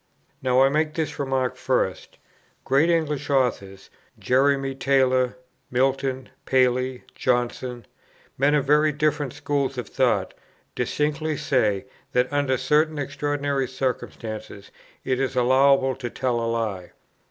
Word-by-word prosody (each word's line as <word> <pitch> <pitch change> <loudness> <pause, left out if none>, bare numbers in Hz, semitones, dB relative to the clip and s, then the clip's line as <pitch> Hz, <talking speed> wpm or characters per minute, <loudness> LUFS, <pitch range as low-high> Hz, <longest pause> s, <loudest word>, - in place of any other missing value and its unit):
Now 130 0 +3
I 135 - +5
make 155 +1 0
this 160 -2 -3
remark 130 -2 -1
first: 125 -7 -2 0.5
great 140 +5 +3
English 150 -4 0
authors, 105 -8 -1 0.3
Jeremy 135 +1 +2
Taylor, 130 -2 +2 0.3
Milton, 130 0 0 0.2
Paley, 130 0 +1
Johnson, 125 -1 -1 0.5
men 140 +3 +3
of 145 - +1
very 150 +2 +4
different 150 -2 0
schools 140 -2 -2
of 120 -4 -4
thought, - - 0 0.4
distinctly 150 +1 -1
say, 110 -9 +1 0.3
that 125 +3 +1
under 140 -2 +1
certain 150 +4 +2
extraordinary 145 -1 -1
circumstances 115 -5 -5 0.3
it 130 -1 0
is 135 -1 -1
allowable 130 +1 +4
to 125 -3 -5
tell 125 -1 -1
a 115 - -1
lie. 105 -6 -3
135 Hz, 120 wpm, -24 LUFS, 125-145 Hz, 0.5 s, I